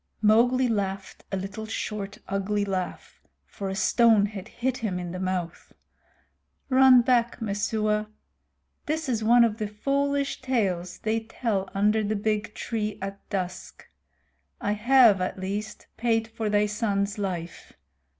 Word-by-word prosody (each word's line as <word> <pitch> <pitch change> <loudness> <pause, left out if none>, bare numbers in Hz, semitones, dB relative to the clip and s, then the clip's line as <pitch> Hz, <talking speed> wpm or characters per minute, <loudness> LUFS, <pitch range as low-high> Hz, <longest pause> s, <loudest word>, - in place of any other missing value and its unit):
Mowgli 240 +4 +4
laughed 195 -3 -3
a 195 - -1
little 195 +3 -6
short 210 -2 -4
ugly 200 +1 -1
laugh, 185 -2 -5 0.2
for 195 -1 -6
a 190 - -3
stone 225 0 +4
had 205 -1 -7
hit 255 +2 -2
him 205 -6 -2
in 175 -1 -5
the 185 - -5
mouth. 185 -2 -4 1.0
"Run 260 -2 +7
back, 240 -2 +2
Messua. 210 0 -1 0.8
This 315 0 -1
is 230 -4 -1
one 235 +2 +6
of 225 -1 0
the 215 - -1
foolish 280 +6 -1
tales 190 -9 -1
they 220 +1 -1
tell 220 -3 -2
under 210 +2 +2
the 210 +1 -1
big 210 0 -1
tree 215 -3 -3
at 195 0 -7
dusk. 185 -3 -5 0.7
I 205 - -1
have 230 -2 +5
at 185 - -2
least 200 +3 -5
paid 225 -1 +1
for 225 -1 -3
thy 205 0 +3
son's 205 -1 -1
life. 180 -4 -5
210 Hz, 140 wpm, -26 LUFS, 195-230 Hz, 1.0 s, Run